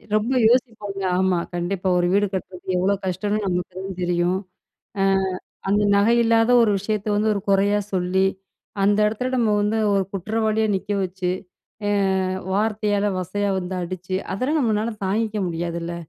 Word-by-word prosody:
ரொம்ப 215 +4 +1 0.2
யோசிப்பாங்க. 220 -5 0 0.2
ஆமா, 190 -2 +2 0.2
கண்டிப்பா. 180 +2 -2
ஒரு 175 0 +2
வீடு 205 0 +3
கட்டுறது 185 0 -4
எவ்ளோ 190 +3 +2
கஷ்டம்னு 205 +3 -1
நமக்கு 180 -1 -2
தான் 190 -1 -6
தெரியும். 175 +1 +1 0.6
அ. - - +4 0.6
அந்த 205 +1 +3
நகை 215 +4 +4
இல்லாத 225 +1 +3
ஒரு 225 - +3
விஷயத்த 205 +1 -3
வந்து 215 +1 +2
ஒரு 200 - -2
குறையா 200 +1 +3
சொல்லி, 190 +1 +1 0.6
அந்த 205 +1 +3
இடத்துல 235 +4 -2
நம்ம 230 -3 +2
வந்து 210 +2 +1 0.2
ஒரு 195 - +2
குற்றவாளியா 220 +3 0
நிக்க 195 +2 -4
வச்சு, 185 0 -3 0.6
அ - - +1 0.6
வார்த்தையால 210 0 +1
வசையா 200 +3 -1
வந்து 185 +1 -4
அடிச்சு, 185 +1 -5 0.2
அதெல்லாம் 270 +10 0
நம்மளால 225 -1 0
தாங்கிக்க 215 +2 -1
முடியாதுல்ல. 170 0 -3
200 Hz, 145 wpm, -22 LUFS, 185-215 Hz, 0.6 s, அ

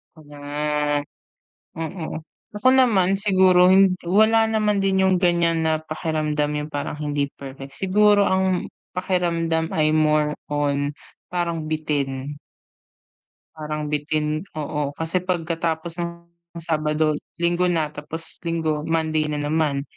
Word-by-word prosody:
Hmm. 145 -1 -2 0.7
Mm, 160 0 -5 0.3
ako 210 +5 +2
naman 195 -7 +4
siguro 185 -2 +5
hi 195 +1 +7 0.2
wala 220 +5 +4
naman 215 -2 +1
din 190 -1 +2
yung 190 -1 +4
ganiyan 170 -2 +2
na 160 -1 +1
pakiramdam 155 -1 -2
yung 150 - -5
parang 145 0 -3
hindi 145 -1 -1
perfect, 135 0 -10
siguro 205 +3 +3
ang 190 -1 +1 0.2
pakiramdam 170 -3 0
ay 155 -1 +2
more 150 -1 +2 0.2
on 145 -1 0 0.4
parang 170 -2 -1
bitin. 145 -3 -2 1.2
Parang 150 -1 -4
bitin, 150 +1 -1
oo. 150 -2 -3
Kasi 165 +4 -1
pagkatapos 170 -1 -2
ng 170 0 -2 0.5
Sabado, 155 -1 0 0.2
Linggo 175 +1 +2
na 160 -4 0
tapos 155 +2 -7
Linggo, 160 -3 -1
Monday 160 -1 0
na 150 -1 -2
naman. 145 -1 0
160 Hz, 115 wpm, -23 LUFS, 150-180 Hz, 1.2 s, hi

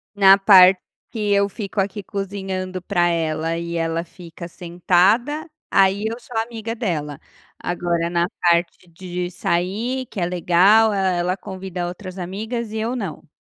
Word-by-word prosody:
Na 195 -1 +7
parte 190 -2 +7 0.3
que 210 -3 -1
eu 200 0 +3
fico 200 0 -4
aqui 200 +1 -3
cozinhando 190 -2 -5
pra 175 -2 +1
ela 165 -1 -1
e 170 0 -4
ela 165 0 -1
fica 170 0 -11
sentada, 185 - +1 0.2
aí 195 +2 +3
eu 230 +2 -3
sou 245 -1 -10
amiga 225 0 -4
dela. 155 - -3 0.4
Agora 170 -1 -2
na 170 0 +1 0.2
parte 170 +1 +1
de 180 +1 -5
sair 215 +10 -2
que 200 - -7
é 175 - +1
legal, 180 +5 +4
e - - -1
e 185 -2 +1
ela 180 +2 0
convida 185 -2 -6
outras 185 +1 -8
amigas 215 +5 -4
e 220 - -3
eu 230 +3 -2
não. 180 - -6
185 Hz, 155 wpm, -21 LUFS, 175-205 Hz, 0.4 s, Na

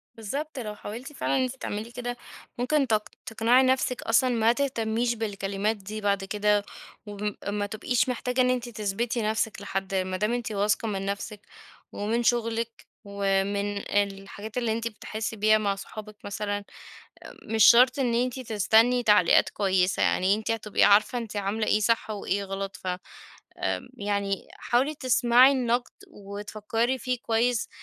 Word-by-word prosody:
بالضبط، 275 +7 -5
لو 210 -3 -5
حاولتِ 235 +8 -8
فعلًا 270 - 0
إن - - +2
أنت 255 +1 -3
تعملي 220 -2 -5
كده 245 0 -5 0.4
ممكن 270 +2 +1
تق 215 -2 0 0.2
تقنعي 235 +2 +3
نفسك 255 -1 +1
أصلًا 250 +3 +3
ما 230 -1 +3
تهتميش 240 -3 0
بالكلمات 205 -1 -2
دي 210 +2 -7
بعد 200 -1 +1
كده، 210 +1 +1 0.4
وما 205 0 -4
ب - - -3
ما 205 0 -1
تبقيش 230 +5 0
محتاجة 250 +1 0
إن 250 - +3
أنتِ 245 -1 -1
تثبتِي 220 +2 -2
نفسِك 215 -1 -1
لحد 195 0 -3
ما 185 0 -1
دام 210 +4 0
أنتِ 240 -2 -3
واثقة 210 +2 0
من 195 -2 -3
نفسِك، 200 +1 -4 0.5
ومن 225 +4 -1
شغلِك، 230 -1 -1 0.2
ومن 200 0 -1
الحاجات 200 +2 -3
اللي 235 -3 0
أنتِ 230 +1 -1
بتحسِي 220 +1 -5
بيها 215 +1 +4
مع 200 -2 0
صحابِك 215 +2 -9
مثلًا، 205 0 -3 0.8
مش 220 -2 +3
شرط 250 +3 +7
إن 245 -3 +1
أنتِ 250 +2 0
تستني 225 +2 +3
تعليقات 210 -6 +5
كويسة، 190 -2 +1
يعني 190 +2 +3
أنتِ 220 +1 -3
هتبقي 220 -2 0
عارفة 210 +5 +4
أنتِ 220 -3 -6
عاملة 205 +2 -1
إيه 215 - +2
صح 230 0 +1
وإيه 200 -1 -2
غلط، 195 0 -5
ف 185 - -7 0.7
امم - - -2
يعني 200 -1 -2
حاولي 265 +6 +1
تسمعي 255 0 +5
النقد 245 -2 0 0.2
وتفكّري 215 +4 -3
فيه 255 - -3
آآ 245 - -8
كويس 230 0 +1
220 Hz, 155 wpm, -26 LUFS, 205-240 Hz, 0.8 s, شرط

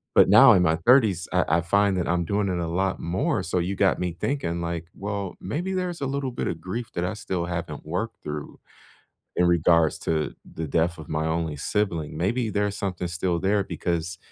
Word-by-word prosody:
But - - +7
now - - +9
in 90 - +4
my 80 -2 +3
30s, 110 -10 +4
I - - +4 0.2
I - - -1
find 100 +3 +2
that 90 - -1
I'm 85 0 +1
doing 100 +3 0
it 90 -1 -1
a 85 - -2
lot 95 +3 -1
more, 85 +3 -1
so 90 +2 -1
you 90 +3 -1
got 95 -1 +2
me 90 -2 -2
thinking, 110 -12 -1
like, 85 -1 -3
"Well, 100 -2 -4
maybe 170 - -3
there's 180 -2 -2
a - - 0
little 135 -1 -2
bit 120 - -3
of 80 - -4
grief 110 +7 -5
that 85 - -2
I 90 - -2
still 95 -4 -3
haven't 85 -3 -5
worked 100 +8 -4
through 75 0 -6 0.8
in 90 - +4
regards 85 -2 +3
to 80 -2 -1
the 80 0 -6
death 85 +4 +1
of 80 -2 -10
my 80 0 -1
only 80 -1 -1
sibling. 80 -2 -1
Maybe 110 +7 0
there's 105 -1 0
something 90 -3 -3
still 85 0 -1
there," 100 +2 +2
because, 85 -2 -3
90 Hz, 210 wpm, -25 LUFS, 85-100 Hz, 0.8 s, now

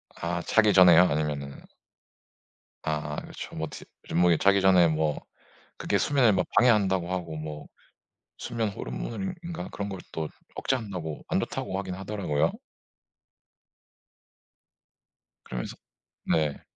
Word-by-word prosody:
아 85 +1 -2
자기 105 +4 +4
전에요? 90 -2 +8
아니면은 75 -2 -2 1.2
아 75 -1 -2
그렇죠. - - -9
뭐 80 0 -3
디 - - -10 0.2
좀 85 - 0
뭐 90 0 +5
그게 85 - +4
자기 100 +2 +4
전에 90 -3 +6
뭐 80 -1 0 0.6
그게 - - 0
수면을 130 -7 +3
뭐 95 - +2
방해한다고 95 -7 +4
하고 85 -3 -3
뭐 75 -1 -7 0.7
수면 115 -2 -2
호르몬인가 170 - -5
그런 100 0 -4
걸 95 -2 -5
또 80 -1 -3 0.3
억제한다고 95 - -3
안 - - +1
좋다고 95 - -3
하긴 95 -2 -4
하더라고요. 95 -6 -1 2.9
그러면서 - - -5 0.5
네. 75 -3 0
90 Hz, 255 characters per minute, -27 LUFS, 80-100 Hz, 2.9 s, 전에요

